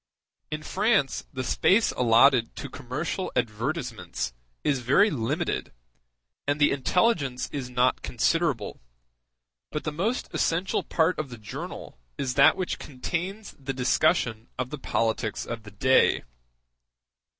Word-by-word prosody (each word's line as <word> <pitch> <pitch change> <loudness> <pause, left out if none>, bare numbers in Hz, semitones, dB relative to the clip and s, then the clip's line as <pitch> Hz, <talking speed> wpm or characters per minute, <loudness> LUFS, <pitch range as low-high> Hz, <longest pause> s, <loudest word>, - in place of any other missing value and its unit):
In 155 0 -4
France 200 - +1
the 130 -1 -4
space 205 - +3
allotted 120 0 +4
to 140 - -6
commercial 145 +8 -4
advertisements 115 - -2 0.3
is 140 -2 +1
very 140 - +4
limited, 115 -7 -2 0.7
and 145 +1 +1
the 145 - +5
intelligence 140 - +1
is 135 -4 -4
not 125 +1 +2
considerable, 140 -3 0 0.9
but 150 - -3
the 155 - -2
most 200 +11 -1
essential 175 +4 +1
part 165 +2 +1
of 155 -3 -3
the 120 - -8
journal 105 - -8 0.2
is 130 -2 -1
that 140 +7 +6
which 185 -2 -2
contains 180 +9 -4
the 135 0 -4
discussion 120 -3 +1
of 125 0 -3
the 150 - -5
politics 110 -3 -1
of 115 -1 -5
the 105 - -11
day. 130 +6 +3
135 Hz, 130 wpm, -26 LUFS, 120-165 Hz, 0.9 s, that